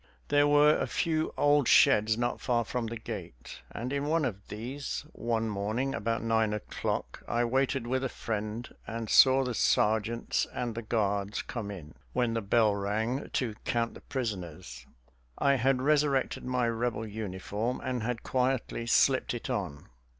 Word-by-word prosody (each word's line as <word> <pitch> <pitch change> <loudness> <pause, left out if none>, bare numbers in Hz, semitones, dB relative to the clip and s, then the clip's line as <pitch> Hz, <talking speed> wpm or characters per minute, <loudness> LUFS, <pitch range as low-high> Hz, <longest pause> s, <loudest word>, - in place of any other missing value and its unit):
There 145 0 +4
were 145 +1 +6
a - - -1
few 160 -1 0
old 145 -3 +4
sheds 110 +1 +5
not 120 0 -1
far 120 -2 +1
from 120 -1 -2
the 115 +1 -5
gate, 60 - -8
and 125 +4 -5
in 140 0 -1
one 160 0 +2
of 100 -5 -5
these 130 +7 -5
one 115 -1 -1
morning 110 +6 -1
about 115 -4 -1
nine 110 -2 +2
o'clock 105 - -3
I 120 +1 +1
waited 130 +1 0
with 130 +2 -1
a 135 - -1
friend, 110 +1 -4 0.2
and 115 -1 -4
saw 135 0 +7
the 125 -1 -2
sergeants 110 +1 +1
and 120 -2 -2
the 115 - -4
guards 105 -2 -1
come 110 -4 -5
in, 85 -7 -8 0.2
when 120 -2 +1
the 115 - -1
bell 110 +1 +3
rang, 110 +6 -2
to 120 -5 0
count 115 -1 0
the - - -12
prisoners. 90 - -5 0.5
I 140 - +3
had 130 0 +2
resurrected 145 -2 +1
my 125 -1 +1
Rebel 115 -1 -1
uniform 105 +2 -3
and 130 -2 -3
had 115 +1 -3
quietly 125 -2 -1
slipped 130 +1 +3
it 120 - -5
on. 80 -8 -4
115 Hz, 165 wpm, -29 LUFS, 110-130 Hz, 0.5 s, saw